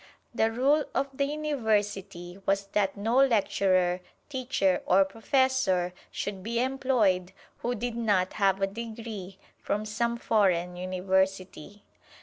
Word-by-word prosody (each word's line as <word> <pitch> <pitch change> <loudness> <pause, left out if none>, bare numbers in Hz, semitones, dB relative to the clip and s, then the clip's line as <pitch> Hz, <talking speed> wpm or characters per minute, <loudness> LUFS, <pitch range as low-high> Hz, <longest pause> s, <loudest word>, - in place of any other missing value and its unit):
The 225 -1 +2
rule 280 +6 +2
of 275 0 -1
the 280 - +1
University 205 - -2
was 195 0 +1
that 195 -1 0
no 225 +5 0
lecturer, 190 -8 +3 0.3
teacher 245 -9 0
or 190 +2 +5
professor 225 -5 +1 0.2
should 200 -2 -4
be 230 +4 -2
employed 240 -9 +1 0.3
who 245 +1 -2
did 240 +1 -3
not 205 -6 +1
have 195 -2 +2
a - - +6
degree 215 -2 -7 0.2
from 210 +1 -2
some 235 +2 -1
foreign 180 -6 +1
University. 190 +1 -2
205 Hz, 125 wpm, -28 LUFS, 190-240 Hz, 0.3 s, a